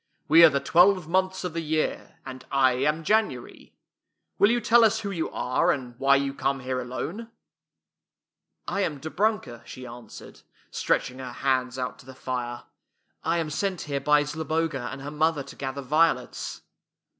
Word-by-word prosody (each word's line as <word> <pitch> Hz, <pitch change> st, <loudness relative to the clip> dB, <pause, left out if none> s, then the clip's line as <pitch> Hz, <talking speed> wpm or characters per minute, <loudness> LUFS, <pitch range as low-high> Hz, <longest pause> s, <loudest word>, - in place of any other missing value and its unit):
"We 165 Hz, +3 st, +7 dB
are 165 Hz, -, +10 dB
the 140 Hz, -, 0 dB
twelve 175 Hz, +4 st, +4 dB
months 185 Hz, +2 st, 0 dB
of 180 Hz, -3 st, -4 dB
the 165 Hz, -, -2 dB
year, 155 Hz, 0 st, -2 dB
and 130 Hz, -1 st, -8 dB
I 135 Hz, -2 st, +4 dB
am 150 Hz, +6 st, 0 dB
January. 210 Hz, -, -1 dB, 0.6 s
Will 200 Hz, -, +6 dB
you 240 Hz, +1 st, +2 dB
tell 235 Hz, +1 st, +5 dB
us 220 Hz, 0 st, +3 dB
who 200 Hz, -2 st, -4 dB
you 170 Hz, -4 st, -2 dB
are, 130 Hz, +7 st, 0 dB
and 125 Hz, -5 st, -4 dB
why 140 Hz, 0 st, +5 dB
you 140 Hz, 0 st, 0 dB
come 135 Hz, 0 st, -1 dB
here 130 Hz, 0 st, -2 dB
alone? 165 Hz, -, -5 dB, 0.4 s
" -, -, -63 dB
" -, -, -52 dB
I -, -, +1 dB
am 155 Hz, -7 st, -2 dB
Dobrunka," 165 Hz, -, -1 dB
she 130 Hz, +2 st, -10 dB
answered, 120 Hz, -2 st, -11 dB, 0.3 s
stretch -, -, 0 dB
ing 130 Hz, -, -13 dB
her 130 Hz, -1 st, -6 dB
hands 130 Hz, -1 st, 0 dB
out 125 Hz, -1 st, -4 dB
to -, -, -16 dB
the 130 Hz, -, -11 dB
fire. 125 Hz, -2 st, -4 dB, 0.3 s
" -, -, -48 dB
I 165 Hz, +1 st, +1 dB
am 160 Hz, -2 st, -2 dB
sent 190 Hz, +2 st, -2 dB
here 140 Hz, -2 st, -3 dB
by 150 Hz, +1 st, +4 dB
Zloboga 155 Hz, -3 st, -2 dB
and 135 Hz, -, -8 dB
her 145 Hz, -, -6 dB
mother 155 Hz, -1 st, +1 dB
to -, -, -12 dB
gather 135 Hz, 0 st, -5 dB
violets." 150 Hz, -3 st, 0 dB
145 Hz, 185 wpm, -26 LUFS, 130-170 Hz, 0.6 s, are